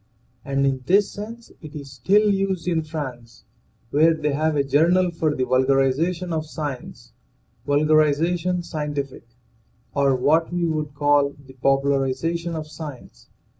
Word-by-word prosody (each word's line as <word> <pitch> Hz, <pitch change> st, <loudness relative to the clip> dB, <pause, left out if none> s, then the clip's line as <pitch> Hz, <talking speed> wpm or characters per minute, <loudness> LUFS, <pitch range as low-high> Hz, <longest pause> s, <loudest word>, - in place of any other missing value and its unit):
And 140 Hz, 0 st, 0 dB
in 135 Hz, -1 st, 0 dB
this 200 Hz, +2 st, +3 dB
sense 230 Hz, +3 st, -9 dB
it 155 Hz, -1 st, -10 dB
is 140 Hz, -2 st, -8 dB
still 200 Hz, -, +3 dB
used 190 Hz, -3 st, -1 dB
in 165 Hz, -2 st, +1 dB
France, 130 Hz, -7 st, -7 dB, 0.5 s
where 160 Hz, +3 st, +4 dB
they 150 Hz, -1 st, -1 dB
have 155 Hz, +2 st, 0 dB
a 140 Hz, -, +2 dB
journal 175 Hz, +6 st, +3 dB
for 160 Hz, -3 st, -1 dB
the 130 Hz, -, 0 dB
vulgarization 135 Hz, +7 st, +1 dB
of 155 Hz, -1 st, -2 dB
science 140 Hz, -, -7 dB, 0.3 s
(" -, -, -40 dB
Vulgarisation 155 Hz, +4 st, +2 dB
Scientifique 145 Hz, -7 st, -5 dB, 0.3 s
")> 115 Hz, +1 st, -39 dB
or 140 Hz, -1 st, +3 dB
what 155 Hz, +7 st, +2 dB
we 175 Hz, -1 st, 0 dB
would 155 Hz, -3 st, -2 dB
call 145 Hz, -1 st, +2 dB
the 130 Hz, -, -14 dB
popularization 140 Hz, +5 st, 0 dB
of 155 Hz, -1 st, -4 dB
science. 150 Hz, -4 st, -10 dB
150 Hz, 145 wpm, -23 LUFS, 135-170 Hz, 0.5 s, where